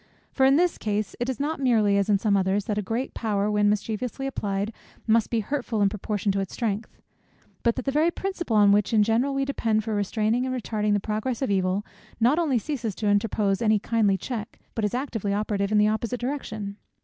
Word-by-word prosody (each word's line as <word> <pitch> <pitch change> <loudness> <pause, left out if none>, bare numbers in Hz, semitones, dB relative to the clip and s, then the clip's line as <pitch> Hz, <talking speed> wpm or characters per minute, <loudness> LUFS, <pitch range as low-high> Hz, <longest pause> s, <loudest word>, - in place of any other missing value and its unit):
For 265 -1 +3
in 270 - +5
this 350 +3 +2
case 210 -1 -2
it 245 +2 -1
is 260 - -3
not 300 +2 -1
merely, 225 -6 +3
as 200 +1 +1
in 205 - +5
some 200 0 +1
others, 195 +1 +1
that 210 -1 -1
a - - 0
great 225 +6 -3
power, 210 -2 0
when 205 0 +3
mischievously 220 +5 -2
applied, 205 -4 -2 0.3
must 225 -1 +3
be 230 -2 +1
hurtful 240 -2 -2
in 200 -1 +4
proportion 205 0 -2
to 195 - -1
its 195 -2 -4
strength; 215 -2 -3 0.6
but 235 -1 +2
that 255 - -4
the 275 - +1
very 305 +4 +3
principle 345 - -3
on 205 -1 +6
which 210 +2 +2
in 210 - +6
general 235 +6 +1
we 275 0 +1
depend 225 -6 0
for 220 0 -3
restraining 215 +4 0
and 255 - -2
retarding 210 -2 -1
the 205 - +2
progress 220 +5 -2
of 260 - 0
evil, 190 +1 0 0.3
not 250 +8 +3
only 295 -7 +2
ceases 235 -5 -3
to 215 - -4
interpose 205 -1 +1
any 215 -2 +4
kindly 210 -2 +1
check, 220 -1 -6 0.2
but 225 - -3
is 210 +3 0
actively 225 -7 -2
operative 205 -1 -1
in 215 - +3
the 210 0 +5
opposite 230 +3 -1
direction. 220 -6 -4
215 Hz, 220 wpm, -25 LUFS, 205-250 Hz, 0.6 s, on